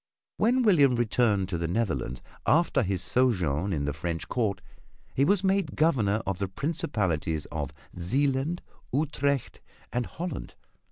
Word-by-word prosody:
When 250 +4 +3
William 145 - +5
returned 110 -4 +2
to 85 -3 -2
the 85 - -1
Netherlands 85 - -1 0.2
after 160 -3 +4
his 95 -4 -1
sojourn 95 - +1
in 75 -5 -1
the 75 - -1
French 85 +2 -3
court 105 -6 0 0.5
he 135 - +2
was 195 +5 +3
made 195 0 +1
Governor 110 -10 +2
of 95 -2 -2
the 100 - 0
principalities 95 - -1
of 75 -2 -3 0.2
Zeeland, 135 - 0 0.3
Utrecht 140 -1 0 0.3
and 125 0 0
Holland. 175 -4 -6
115 Hz, 135 wpm, -28 LUFS, 90-145 Hz, 0.5 s, William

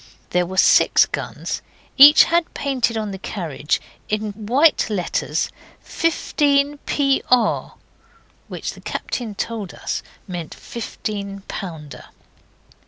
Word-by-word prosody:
There 180 0 +1
were 190 +1 -7
six - - +6
guns. - - -5 0.3
Each 290 +2 +10
had 340 0 0
painted 255 -5 0
on 215 -2 -3
the 190 - -7
carriage, 160 -7 -2 0.3
in 215 0 -1
white 245 +9 +2
letters, 195 -5 -1 0.3
15 290 -3 +1
Pr., 270 -4 +1 0.7
which - - -5
the - - -14
captain 225 -5 -4
told 215 -2 -4
us - - -3 0.3
meant 175 -4 -6
fifteen 200 -3 -6
pounder. 160 -8 -7
215 Hz, 105 wpm, -21 LUFS, 195-275 Hz, 0.7 s, Each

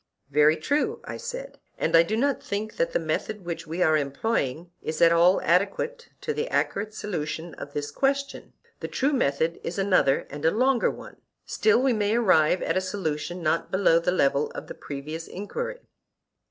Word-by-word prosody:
Very 150 +2 +5
true, 300 - 0
I - - -6
said; - - -7 0.2
and - - +1
I 165 - +9
do 210 +6 -1
not 275 +3 +1
think 210 +2 -4
that 165 - +1
the - - +1
method 170 +5 -3
which 165 -1 -5
we 170 +3 0
are 155 -2 +4
employing 155 - -1
is 155 0 -4
at 170 - +6
all 170 +2 +5
adequate 205 - 0
to 455 - -2
the 455 +2 -2
accurate 215 +2 -1
solution 165 -5 -4
of 145 - -9
this 145 0 -3
question; 275 +1 -1 0.3
the - - -4
true 275 +3 0
method 160 - 0
is 175 - -4
another 185 -8 +3
and 145 +1 -7
a 160 - +5
longer 250 +5 +2
one. - - -9 0.3
Still 435 - +3
we 265 -2 +3
may 210 0 +1
arrive 185 -7 +3
at - - 0
a 185 - +2
solution 175 -3 -3
not 160 +1 0
below 190 -3 +4
the 170 +2 0
level 140 -4 +2
of - - -7
the - - -8
previous 150 +3 -7
enquiry. 485 - -5
180 Hz, 185 wpm, -26 LUFS, 155-230 Hz, 0.3 s, I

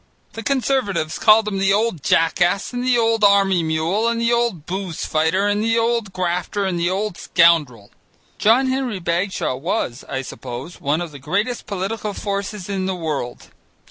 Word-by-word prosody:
The 225 - -6
Conservatives 235 - -1
called 215 0 +5
him 195 -2 -2
the 195 0 +2
old 210 -6 0
jackass 175 - +1
and 245 0 -2
the 250 -1 +3
old 225 -1 +2
army 195 -3 +4
mule 165 +7 0
and 235 0 0
the 235 +1 +2
old 235 -10 0
booze 185 -2 -4
fighter 160 +5 +1
and 205 +1 +1
the 225 +1 +1
old 230 -3 0
grafter 180 +2 -2
and 180 -3 -1
the 170 +1 +1
old 195 0 -2
scoundrel. 145 -11 +2 0.5
John 230 +5 +4
Henry 260 -4 -1
Bagshaw 175 -3 -1
was, 140 - -2
I 135 0 -3
suppose, 125 +6 -8
one 150 +4 0
of 170 -3 -5
the 145 - -10
greatest 210 - -2
political 205 +1 -3
forces 200 -1 -4
in 190 -2 -2
the 190 - -1
world. 150 -8 -4
195 Hz, 175 wpm, -20 LUFS, 170-225 Hz, 0.5 s, called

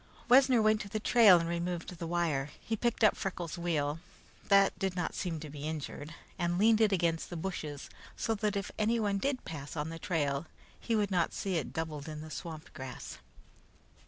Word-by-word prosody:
Wessner 255 -2 +6
went 215 0 +3
to 200 - -7
the 215 - -2
trail 215 -4 +7
and 165 - -2
removed 170 +1 -3
the 170 - -4
wire. 165 -5 0
He 225 - -2
picked 235 +1 0
up 215 - +6
Freckles' 175 -4 -4
wheel, 155 -3 0 0.5
that 195 -1 +4
did 190 -2 -1
not 175 - -2
seem 170 -4 -3
to 155 - -6
be 145 +1 -5
injured, 155 0 -5 0.2
and 175 0 0
leaned 220 +2 +5
it 215 -2 +5
against 170 -3 +1
the 175 - -5
bushes 155 -5 -5 0.3
so 225 - 0
that 210 -1 -1
if 200 - -3
anyone 215 -2 +1
did 275 +2 -1
pass 145 -2 -7
on 150 +1 -2
the 165 0 -7
trail 145 -3 -1 0.3
he 230 - -1
would 205 -2 +1
not 175 -3 +1
see 195 -2 -2
it 160 - -2
doubled 155 -2 -4
in 155 -1 -6
the 155 0 -9
swamp 160 -1 -7
grass. 130 -1 -7
175 Hz, 195 wpm, -32 LUFS, 155-210 Hz, 0.5 s, trail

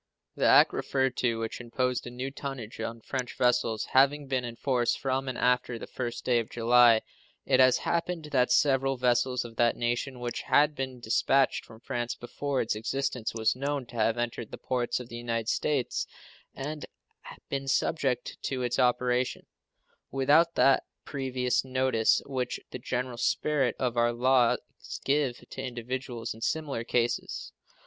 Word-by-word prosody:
The - - +2
act - - +6
referred 130 -2 0
to, 115 -2 +1
which 115 +2 -4
imposed 125 +1 -1
new 125 +2 -5
tonnage 135 -6 -7
on 115 +1 -4
French 130 +1 -4
vessels, 125 -3 +1
having 140 +2 +4
been 130 -2 -1
in 120 -1 -6
force 120 -2 +1
from 135 0 -2
and 130 - -3
after 125 -1 +1
the - - -7
first 120 -2 -5
day 120 -2 +3
of 115 - -4
July, 120 -1 +5 0.4
it - - +3
has 130 -1 +6
happened 170 -2 -2
that 125 -2 +2
several 135 0 +3
vessels 125 0 +1
of 115 -1 -11
that 120 0 +3
nation 120 +2 -2
which 120 -1 -3
had 150 +1 +3
been 130 -3 -5
dispatched 130 +4 +2
from 110 0 -15
France 120 -1 -3
before 140 +2 -3
its 115 - 0
existence 120 +1 -2
was 110 +1 +1
known 140 0 -2
have 115 0 +1
entered 120 -1 -3
the - - -8
ports 125 -1 -1
of 125 - -8
the 115 - -8
United 115 -1 -2
States, 140 -5 0 0.5
and 150 +3 -5 0.6
been 135 0 -3
subject 135 -1 0
to 130 -2 -2
its 125 +1 -1
operation, 125 0 +1 0.6
without 150 +5 +3
that 135 0 +5 0.2
previous 130 -3 -1
notice 130 -3 +2
which 130 -2 -3
the 125 - -6
general 125 0 -3
spirit 140 -4 +1
of 125 -2 -1
our 120 0 +3
laws 125 0 +3 0.5
gives 140 -3 0
to - - -5
individuals 125 -1 -4
in 110 - -14
similar 140 -3 -2
cases. 120 0 -1
125 Hz, 160 wpm, -28 LUFS, 120-135 Hz, 0.6 s, act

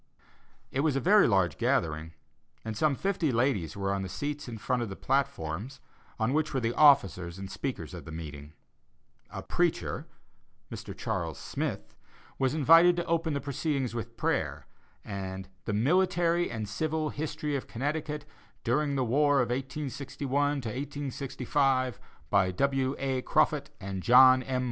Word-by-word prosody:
It 135 - -2
was 145 -1 +2
a - - +2
very 205 +7 +5
large 95 -5 +2
gathering, 80 0 0 0.5
and 110 -1 -4
some 145 +5 +2
fifty 180 -3 0
ladies 115 - 0
were 100 0 -1
on 100 - -1
the 95 - -5
seats 145 +6 -4
in 115 -2 -6
front 125 +3 -1
of 115 - -3
the 95 - -6
platform, 105 - -1 0.5
on 110 +4 +1
which 155 -1 0
were - - +2
the 115 -1 -1
officers 95 - +4
and 95 0 -7
speakers 120 - -4
of - - -8
the 80 - -8
meeting. 75 -2 -8 0.8
A - - -7
"preacher," - - -1 0.6
Mr. - - -7
Charles 85 -4 -3
Smith, - - -4 0.4
was 130 +2 +1
invited 165 +4 +6
to 175 0 -2
open 165 -2 0
the - - 0
proceedings 140 -2 -2
with 115 0 -6
prayer, - - -1 0.4
and 95 -2 -5 0.2
"The 105 - -2
Military 175 - +2
and 110 -3 -4
Civil 155 +7 -1
History 150 -1 -3
of 135 - -4
Connecticut, 150 +3 -3 0.4
during 140 +4 +1
the 130 -2 +1
War 145 +4 +3
of 120 -1 +1
1861 140 +1 -2 0.5
65," 130 -2 0 0.3
by 95 -2 +4
W. 135 +6 0
A. 135 -1 -1
Croffut - - +1
and 95 -1 -5
John 130 +3 +7
M. 130 0 -2
130 Hz, 155 wpm, -29 LUFS, 105-145 Hz, 0.8 s, John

